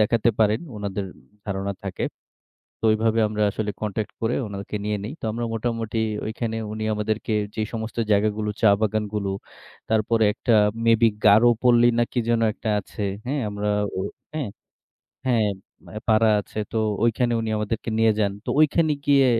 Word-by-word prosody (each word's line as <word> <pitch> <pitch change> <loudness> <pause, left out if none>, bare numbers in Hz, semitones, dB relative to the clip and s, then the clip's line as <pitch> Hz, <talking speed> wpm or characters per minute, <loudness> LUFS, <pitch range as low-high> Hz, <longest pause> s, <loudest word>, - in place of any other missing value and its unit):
দেখাতে 115 +2 +3
পারেন। 110 0 +3 0.2
উনাদের 100 -1 -3 0.4
ধারণা 100 0 -2
থাকে। 95 -2 -3 0.8
তো 115 - +3
ওইভাবে 110 +1 +2
আমরা 105 0 -1
আসলে 105 +1 -2
কনট্যাক্ট 105 0 -3
করে 115 +2 +1
ওনাকে 100 +1 -5
নিয়ে 105 0 0
নেই। 115 - -5
তো - - -8
আমরা 120 +2 -3
মোটামুটি 115 -1 -2 0.3
ওইখানে 110 +1 -3 0.2
উনি 110 0 -5
আমাদেরকে 110 +1 -2 0.2
যে - - -1
সমস্ত 115 0 -5
জায়গাগুলো 105 +1 +1
চা - - +6
বাগানগুলো 105 -1 -1 0.6
তারপরে 110 0 +2
একটা 120 - 0 0.3
মেবি 115 0 +5 0.2
গারো 110 +4 +7 0.2
পল্লী 120 -1 +5
না - - +4
কি 125 - -1
যেন 115 -1 +3
একটা 110 - -6
আছে। 100 - -12 0.3
হ্যাঁ 140 +3 -1
আমরা 105 0 -3 0.3
ও - - 0 0.3
হ্যাঁ, 150 -8 -2 0.8
হ্যাঁ 115 -4 +3 0.4
ম - - -17 0.2
পাড়া 110 0 +4
আছে। 105 - -9
তো - - -1 0.3
ঐখানে 120 +1 +2
উনি 115 - -3
আমাদেরকে 105 +2 -2
নিয়ে 110 0 +5
যান। 100 -2 +2
তো - - -3
ঐখানে 155 +1 +3
গিয়ে 140 -2 +5
110 Hz, 160 wpm, -24 LUFS, 105-115 Hz, 0.8 s, গারো